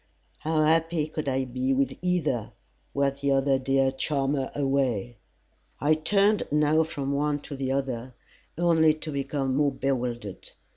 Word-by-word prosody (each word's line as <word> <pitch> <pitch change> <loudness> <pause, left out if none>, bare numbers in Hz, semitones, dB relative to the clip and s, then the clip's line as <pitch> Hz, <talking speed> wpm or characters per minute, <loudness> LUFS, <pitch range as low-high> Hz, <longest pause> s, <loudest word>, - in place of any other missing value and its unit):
"How 155 0 +1
happy 165 0 +2
could 155 -2 -4
I 130 0 0
be 130 +1 -1
with 135 +1 0
either, 160 -11 -1 0.4
Were 140 0 +1
t'other 140 -1 +1
dear 135 0 +2
charmer 135 0 -1
away." 130 -5 0 0.6
I 145 +3 +3
turned 200 +6 +2
now 150 +1 +3
from 145 -3 -3
one 145 +1 +1
to 145 - -7
the 135 -1 -2
other, 130 -2 -3 0.4
only 160 -2 +4
to 155 0 -6
become 140 -1 -2
more 145 0 +2
bewildered. 125 -6 -3
140 Hz, 140 wpm, -26 LUFS, 135-155 Hz, 0.6 s, only